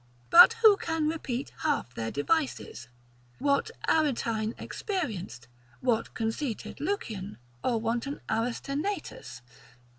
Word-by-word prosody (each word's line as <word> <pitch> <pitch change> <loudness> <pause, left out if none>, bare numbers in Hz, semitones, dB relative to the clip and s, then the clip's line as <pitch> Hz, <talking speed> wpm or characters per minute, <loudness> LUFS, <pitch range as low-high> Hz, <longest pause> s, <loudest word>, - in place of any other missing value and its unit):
But 355 +6 +10
who 425 -3 +8
can 325 -4 -1
repeat 280 -5 -3
half 290 - -1
their 115 0 -3
devices? 145 - -1 0.5
What 280 - +1 0.2
Aretine 230 -7 +1
experienced, 205 - -4 0.3
what 240 -3 0
conceited 225 +2 -3
Lucian, 220 - -3 0.3
or 235 -3 +1
wanton 235 +5 -2
Aristenaetus? 250 - -3
250 Hz, 95 wpm, -29 LUFS, 220-315 Hz, 0.5 s, But